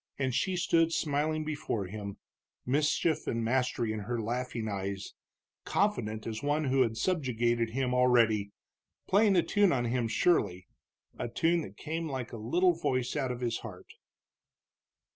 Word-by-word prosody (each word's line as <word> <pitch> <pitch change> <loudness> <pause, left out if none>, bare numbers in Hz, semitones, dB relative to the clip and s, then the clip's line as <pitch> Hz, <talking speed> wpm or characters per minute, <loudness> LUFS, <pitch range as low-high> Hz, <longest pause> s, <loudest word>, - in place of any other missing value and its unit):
And 130 -2 -1
she 185 +8 0
stood 165 -2 +2
smiling 155 0 0
before 150 -9 -2
him, 100 +1 -6 0.5
mischief 150 +4 +1
and 115 0 -1
mastery 125 -2 0
in 110 - -3
her 115 +3 -3
laughing 115 0 -3
eyes, 100 -1 -4 0.5
confident 110 - 0
as 110 -1 -4
one 145 +2 +1
who 135 -1 +2
had 115 -3 +1
subjugated 120 -8 0
him 125 +1 -1
already, 115 -5 +3 0.6
playing 200 0 +4
a 175 - +4
tune 205 -3 +3
on 120 -5 +1
him, 120 0 0
surely 105 - +1 0.5
a 120 - -2
tune 165 +7 +2
that 100 -8 -9
came 160 +1 -4
like 130 -3 -4
a - - -5
little 175 +12 +2
voice 130 -7 -1
out 135 -4 0
of 125 0 -5
his 120 -2 -1
heart. 95 -5 -10
125 Hz, 155 wpm, -30 LUFS, 110-155 Hz, 0.6 s, playing